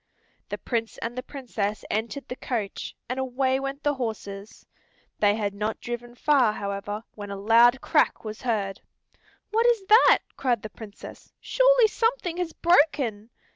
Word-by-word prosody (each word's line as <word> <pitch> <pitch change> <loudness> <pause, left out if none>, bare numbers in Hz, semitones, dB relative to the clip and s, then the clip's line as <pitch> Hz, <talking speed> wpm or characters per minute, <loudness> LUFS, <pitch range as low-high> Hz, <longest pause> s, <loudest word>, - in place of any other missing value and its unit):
The - - -3
Prince 230 -2 -3
and 235 +1 -5
the 255 - -3
Princess 225 -7 -4
entered 230 +6 -3
the 250 - -5
coach, 230 -6 -4
and 255 +2 -3
away 260 0 0
went 275 +1 -5
the 290 - +2
horses. 215 -5 -6 0.5
They 205 -1 +4
had 205 -2 -2
not 210 +2 -3
driven 240 0 -6
far, 255 -5 +3
however, 200 +1 -4
when 205 -1 -8
a 200 - -4
loud 235 +5 +5
crack - - +1
was 215 0 -6
heard. 210 -6 -2 0.7
"What 455 +2 +3
is 460 -5 +2
that?" 435 +5 +7 0.2
cried 245 -5 0
the 215 - -7
Princess. 215 -3 -11
"Surely - - +4
something 445 -5 0
has 355 -2 -2
broken." 285 - +2
240 Hz, 155 wpm, -26 LUFS, 215-280 Hz, 0.7 s, that